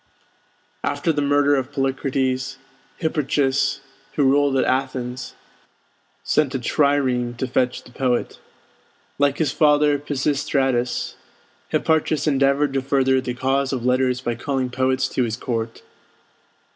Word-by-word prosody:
After 145 Hz, +3 st, 0 dB
the 145 Hz, -, -1 dB
murder 145 Hz, 0 st, +3 dB
of 135 Hz, 0 st, -1 dB
Polycrates, 135 Hz, -1 st, -1 dB, 0.4 s
Hipparchus, 140 Hz, -4 st, 0 dB, 0.3 s
who 145 Hz, -, +1 dB
ruled 140 Hz, 0 st, +3 dB
at -, -, +2 dB
Athens, 130 Hz, -1 st, -2 dB, 0.9 s
sent 145 Hz, -3 st, +1 dB
a -, -, 0 dB
trireme 130 Hz, -3 st, +1 dB
to 130 Hz, -, -1 dB
fetch 125 Hz, 0 st, 0 dB
the -, -, -16 dB
poet. 125 Hz, -1 st, -1 dB, 0.8 s
Like 145 Hz, 0 st, +2 dB
his 160 Hz, -, +1 dB
father 150 Hz, -1 st, +3 dB
Pisistratus, 135 Hz, -3 st, -1 dB, 0.5 s
Hipparchus 155 Hz, -2 st, +1 dB
endeavored 140 Hz, -1 st, +2 dB
to 135 Hz, -, +1 dB
further 130 Hz, -1 st, +2 dB
the 125 Hz, -1 st, -4 dB
cause 135 Hz, +2 st, 0 dB
of 125 Hz, -3 st, -3 dB
letters 125 Hz, 0 st, +2 dB
by 120 Hz, -2 st, -1 dB
calling 130 Hz, +1 st, -2 dB
poets 130 Hz, +1 st, +1 dB
to -, -, -1 dB
his 115 Hz, -1 st, -2 dB
court. 115 Hz, -3 st, -4 dB
135 Hz, 125 wpm, -22 LUFS, 130-145 Hz, 0.9 s, murder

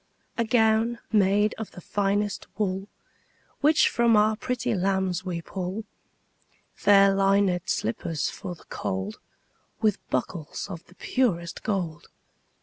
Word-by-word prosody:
A 235 Hz, -, +1 dB
gown 225 Hz, 0 st, +3 dB
made 205 Hz, 0 st, +3 dB
of 220 Hz, -, -5 dB
the -, -, -12 dB
finest 205 Hz, +2 st, -1 dB
wool 195 Hz, -2 st, -1 dB, 0.7 s
Which 300 Hz, +2 st, +5 dB
from 235 Hz, -2 st, +3 dB
our 215 Hz, +1 st, +4 dB
pretty 250 Hz, +1 st, -2 dB
lambs 190 Hz, -2 st, 0 dB
we 175 Hz, -3 st, -4 dB
pull; 190 Hz, +5 st, -4 dB, 0.9 s
Fair 200 Hz, -1 st, +5 dB
linèd 195 Hz, -2 st, +2 dB
slippers 140 Hz, +6 st, -1 dB
for 185 Hz, -3 st, -6 dB
the -, -, -19 dB
cold, 95 Hz, +3 st, -4 dB, 0.6 s
15 -, -, -44 dB
With 215 Hz, -3 st, 0 dB
buckles 150 Hz, +5 st, -3 dB
of 170 Hz, -2 st, -7 dB
the 180 Hz, -, -19 dB
purest 175 Hz, -12 st, -1 dB
gold. 180 Hz, -7 st, -3 dB
195 Hz, 130 wpm, -26 LUFS, 180-220 Hz, 0.9 s, Which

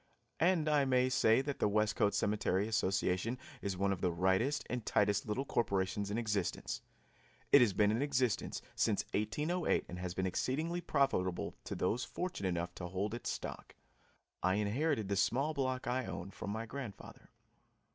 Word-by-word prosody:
And 170 Hz, -2 st, +3 dB
I 150 Hz, -2 st, +4 dB
may 130 Hz, -1 st, +3 dB
say 115 Hz, -1 st, +4 dB
that 145 Hz, 0 st, -4 dB
the -, -, +3 dB
Westcote 105 Hz, 0 st, +2 dB
Cemetery 100 Hz, -1 st, +1 dB
Association 95 Hz, +1 st, 0 dB, 0.2 s
is 100 Hz, -2 st, -2 dB
one 100 Hz, +1 st, +1 dB
of 95 Hz, -2 st, -2 dB
the 90 Hz, -, +2 dB
rightest 95 Hz, -, +1 dB
and 125 Hz, -2 st, -3 dB
tightest 105 Hz, 0 st, +2 dB
little 125 Hz, +6 st, -1 dB
corporations 100 Hz, -4 st, 0 dB
in 105 Hz, -, -1 dB
existence. 105 Hz, -6 st, -1 dB, 0.7 s
It -, -, +9 dB
has 110 Hz, -5 st, +4 dB
been 105 Hz, +2 st, +3 dB
in 115 Hz, +4 st, 0 dB
existence 130 Hz, -5 st, 0 dB
since -, -, +1 dB
1808 150 Hz, -, 0 dB
and 90 Hz, -, -7 dB
has 90 Hz, -1 st, -4 dB
been 95 Hz, -, 0 dB
exceedingly 155 Hz, -, -1 dB
profitable 135 Hz, -, 0 dB
to -, -, -4 dB
those 110 Hz, +7 st, 0 dB
fortunate 170 Hz, -, -3 dB
enough 85 Hz, 0 st, -2 dB
to 90 Hz, -, -6 dB
hold 95 Hz, +4 st, -2 dB
its 120 Hz, -, -4 dB
stock. -, -, -6 dB, 0.7 s
I 95 Hz, +1 st, +2 dB
inherited 110 Hz, +3 st, 0 dB
the 100 Hz, -, 0 dB
small 135 Hz, +10 st, +1 dB
block 130 Hz, -3 st, -1 dB
I 125 Hz, +1 st, 0 dB
own 95 Hz, +1 st, -5 dB
from -, -, -6 dB
my 110 Hz, +2 st, -3 dB
grandfather. 115 Hz, -4 st, -8 dB
110 Hz, 165 wpm, -34 LUFS, 95-130 Hz, 0.7 s, It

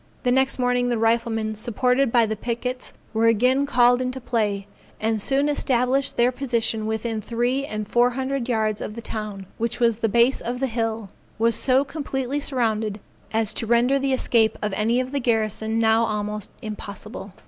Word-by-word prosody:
The 250 Hz, -, +2 dB
next 265 Hz, +1 st, +2 dB
morning 245 Hz, -1 st, +1 dB
the 240 Hz, -, 0 dB
riflemen, 225 Hz, -1 st, +1 dB
supported 250 Hz, +3 st, +1 dB
by 235 Hz, -1 st, +5 dB
the 220 Hz, 0 st, -2 dB
pickets, 245 Hz, +3 st, -4 dB, 0.2 s
were 225 Hz, +1 st, +3 dB
again 250 Hz, +5 st, +3 dB
called 245 Hz, -2 st, +4 dB
into 255 Hz, +1 st, -3 dB
play, 210 Hz, -5 st, -1 dB, 0.3 s
and 220 Hz, -1 st, 0 dB
soon 275 Hz, +6 st, +1 dB
established 265 Hz, -2 st, 0 dB
their 240 Hz, +1 st, +4 dB
position 235 Hz, -4 st, -1 dB
within 220 Hz, 0 st, -2 dB
three 245 Hz, +5 st, -1 dB
and 215 Hz, -3 st, -4 dB
four 240 Hz, +3 st, +3 dB
hundred 260 Hz, 0 st, -3 dB
yards 215 Hz, -3 st, 0 dB
of 210 Hz, -, -5 dB
the 235 Hz, -, -6 dB
town, 210 Hz, -4 st, -5 dB
which 230 Hz, +1 st, -2 dB
with 230 Hz, -2 st, +2 dB
the 225 Hz, -, +2 dB
base 235 Hz, +5 st, +3 dB
of 245 Hz, +1 st, -4 dB
the 270 Hz, -, +1 dB
hill, 225 Hz, -4 st, -3 dB, 0.3 s
was 230 Hz, +1 st, +2 dB
so 260 Hz, +4 st, +2 dB
completely 275 Hz, -2 st, -3 dB
surrounded, 220 Hz, -6 st, -1 dB, 0.3 s
as 220 Hz, -1 st, +1 dB
to 225 Hz, -, -1 dB
render 240 Hz, +4 st, +3 dB
the 275 Hz, 0 st, 0 dB
escape 230 Hz, -4 st, +2 dB
of 210 Hz, -2 st, -2 dB
any 225 Hz, +5 st, +1 dB
of 255 Hz, 0 st, -3 dB
the 285 Hz, -, -1 dB
garrison 220 Hz, -2 st, 0 dB
now 225 Hz, 0 st, +4 dB
almost 210 Hz, -1 st, -3 dB
impossible. 210 Hz, -2 st, -8 dB
235 Hz, 180 wpm, -23 LUFS, 220-255 Hz, 0.3 s, by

